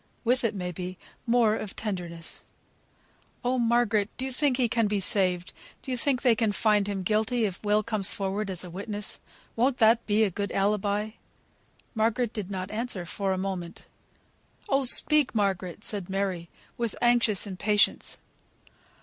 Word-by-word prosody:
With 250 +2 +2
it, 225 -3 0
may 180 -2 -3
be, 180 +1 -6 0.3
more 230 -2 +4
of 210 -3 -6
tenderness. 175 -6 -5 1.0
"Oh! 250 +1 +1
Margaret, 230 -3 +2
do 260 - -2
you 265 - -3
think 265 0 +1
he 250 -3 +2
can 230 -1 +1
be 205 0 0
saved; 185 -3 +1 0.3
do 265 - -5
you - - 0
think 255 +1 0
they 245 -3 +5
can 220 -2 +1
find 210 -1 +2
him 195 -2 -3
guilty 220 +4 +1
if 190 -1 -5
Will 210 +1 +2
comes 210 -3 +1
forward 195 +1 -2
as 185 -2 -3
a 180 - -8
witness? 205 +3 -2 0.4
Won't 250 +3 +2
that 225 0 +4
be 215 +1 +3
a 205 - +1
good 200 +2 -3
alibi?" 205 +1 0 0.8
Margaret 230 +1 0
did 205 -4 -5
not 185 -1 -5
answer 215 -5 -2
for 195 +3 -2
a 190 - 0
moment. 185 -3 -5 0.8
"Oh, 275 -8 +2
speak! 295 +1 +5
Margaret," 195 -1 -1
said 200 -4 -1
Mary, 190 -3 -2 0.3
with 235 -2 -2
anxious 240 -5 +3
impatience. 205 +2 0
210 Hz, 165 wpm, -27 LUFS, 190-235 Hz, 1.0 s, they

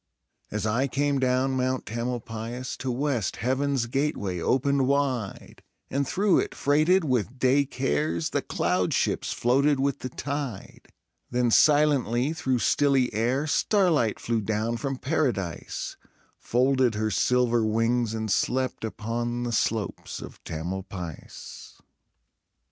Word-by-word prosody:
As 105 0 -3
I 120 +6 +1
came 140 +1 0
down 130 +1 +2
Mount 130 0 -1
Tamalpais, 120 +1 -4
To 130 - -4
west 125 - -1
Heaven's 130 +2 0
gateway 115 - -1
opened 135 +7 +1
wide, 130 -7 -1 0.3
And 140 0 0
through 195 +3 +3
it, - - -3
freighted 155 +6 +3
with 130 -3 -1
day 135 +2 +3
cares, 80 - -1
The - - 0
cloud 90 0 0
ships - - 0
floated 135 +4 +2
with 140 -1 0
the 130 - -5
tide; 140 -6 -5 0.4
Then, 120 -1 +1
silently 145 -2 +3
through 135 -6 0
stilly 135 -4 +2
air, 120 +7 0
Starlight 160 - +2
flew 115 -1 -1
down 110 +3 -1
from 135 +2 -3
Paradise, 125 - -2 0.4
Folded 130 -1 +2
her 110 0 -1
silver 120 +2 +2
wings 115 +1 +1
and 110 -2 -2
slept 130 +5 0
Upon 120 +2 -3
the 120 - -2
slopes 110 -2 -2
of - - -11
Tamalpais. 85 -1 -7
125 Hz, 125 wpm, -26 LUFS, 110-140 Hz, 0.4 s, through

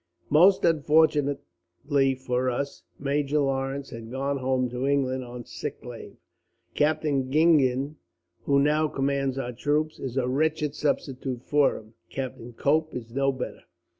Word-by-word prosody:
"Most 180 +6 +6
unfortunately 145 -3 +1
for 130 0 -1
us, 140 +3 -3 0.2
Major 145 +1 0
Lawrence 135 -1 -1
had 115 -1 -8
gone 135 +3 -2
home 130 -1 0
to 125 +2 -2
England 130 -2 +1
on 120 -1 -8
sick - - -6
leave. - - -9 0.6
Captain 150 -3 +1
Gingen, 145 -2 +3 0.5
who 140 - +3
now 150 +2 +3
commands 135 -1 -1
our 125 -2 -3
troops, 150 +5 -1
is 130 -1 -5
a 125 -2 +1
wretched 150 +2 0
substitute 135 -4 -2
for 145 -2 +2
him. 110 +1 -14 0.2
Captain 125 -3 -5
Cope 155 +6 +1
is 115 -2 -7
no 135 +1 +2
better. 130 -1 -6
135 Hz, 135 wpm, -26 LUFS, 130-150 Hz, 0.6 s, Most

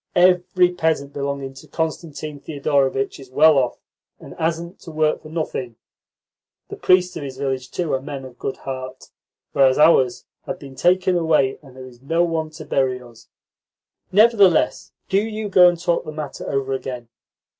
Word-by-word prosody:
Every 180 0 +4
peasant 160 -5 -1
belonging 140 -1 -4
to 135 - -14
Constantine 155 -2 -4
Thedorovitch 140 -3 -1
is 135 -2 -12
well 150 +2 +5
off, 125 -2 -1 0.4
and - - -11
hasn't 170 +2 -3
to 165 - -11
work 155 0 +1
for 155 - -12
nothing. 155 -7 -4 0.9
The - - -6
priests 180 0 +3
of - - -5
his 135 -2 -7
village, 130 -2 -3
too, 175 -4 -2
are 130 - 0
men 135 -1 -7
of 125 -1 -13
good 135 - -4
heart, 130 -1 -7 0.4
whereas 135 -2 +4
ours 150 -5 +4 0.2
have 180 - -3
been 140 -5 -11
taken 180 +6 +2
away, 155 -6 +2
and 135 -4 -16
there 130 0 -9
is 125 -1 -15
no 165 +5 +1
one 165 -2 -1
to 155 0 -11
bury 130 -2 0
us.'" 120 -2 -16 0.8
"Nevertheless, 205 -4 +4 0.2
do 195 +1 +2
you 215 0 -4
go 180 -2 +7
and 175 -1 -3
talk 170 0 0
the - - -7
matter 150 -2 -6
over 135 -1 -1
again." 125 -2 -5
150 Hz, 170 wpm, -21 LUFS, 135-170 Hz, 0.9 s, go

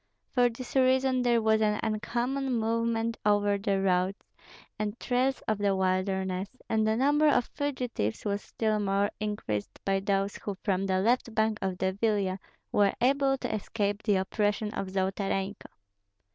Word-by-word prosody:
For 245 -2 +4
this 240 +3 -9
reason 260 0 +3
there 240 -2 +2
was 220 0 +3
an 210 -1 +2
uncommon 240 +5 -1
movement 230 0 0
over 205 -1 +2
the 200 -1 0
roads 185 +1 +1 0.6
and 215 +2 -3
trails 260 +1 0
of 215 -1 0
the 200 -1 +2
wilderness, 190 0 0 0.2
and 220 -1 +1
the 220 - +2
number 290 +4 +3
of 250 -5 +2
fugitives 250 - -2
was 205 0 -1
still 215 -1 -1
more 200 0 +1
increased 205 - -3
by 195 0 +2
those 195 0 0
who 200 -2 -5
from 195 -1 0
the 185 0 +1
left 235 +1 +1
bank 220 0 +1
of 190 -1 -2
the 190 0 0
Vilia 200 -2 0 0.3
were 200 -1 +3
able 270 +1 +3
to 250 - -4
escape 205 -1 -2
the 205 -3 +2
oppression 205 +2 0
of 195 - -3
Zolotarenko. 195 +1 -2
210 Hz, 160 wpm, -29 LUFS, 195-235 Hz, 0.6 s, For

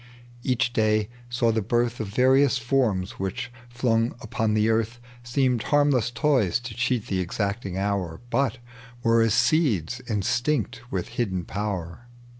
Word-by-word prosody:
Each 120 -1 0
day 110 -1 +2 0.2
saw 120 -1 +2
the 110 0 0
birth 120 +3 0
Of 110 - -3
various 130 +5 +4
forms, 115 -7 0
which, 95 +4 -3 0.2
flung 120 -1 +1
upon 110 -1 -1
the 110 0 +3
earth, 115 +1 0 0.2
Seemed 125 -1 +1
hamiless 145 -5 +2
toys 120 - +2
to 120 -2 -7
cheat 120 -1 0
the 95 - -1
exacting 100 +1 -2
hour, 95 -4 -1
But 135 -4 +1 0.5
were 115 0 +4
as 115 -1 +3
seeds 120 - +2
instinct 120 +4 0
with 90 -6 -2
hidden 95 -7 -2
power. 100 +1 -4
115 Hz, 140 wpm, -25 LUFS, 100-125 Hz, 0.5 s, various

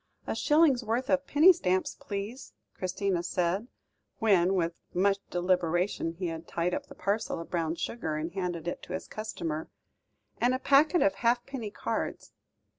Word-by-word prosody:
"A - - -2
shillingsworth 260 -6 +2
of 275 0 +2
penny 320 +6 +7
stamps, 185 - 0
please," 205 +6 -6 0.2
Christina 185 0 -1
said, 180 +5 -1 0.5
when 195 -4 +3
with 170 -2 -1
much 195 +2 +3
deliberation 175 -1 0
he 180 +2 -5
had 165 -1 -4
tied 175 +1 -1
up - - -3
the - - -12
parcel 200 -1 -1
of 165 - -8
brown 165 -2 0
sugar 165 -4 -3
and 155 +2 -3
handed 175 -3 -3
it 175 - -3
to - - -8
his 185 - -4
customer, 165 -7 -4 0.7
"and 245 +2 +3
a - - 0
packet 290 +6 +4
of 195 - +3
halfpenny 240 +1 -1
cards." - - -4
190 Hz, 155 wpm, -29 LUFS, 175-235 Hz, 0.7 s, penny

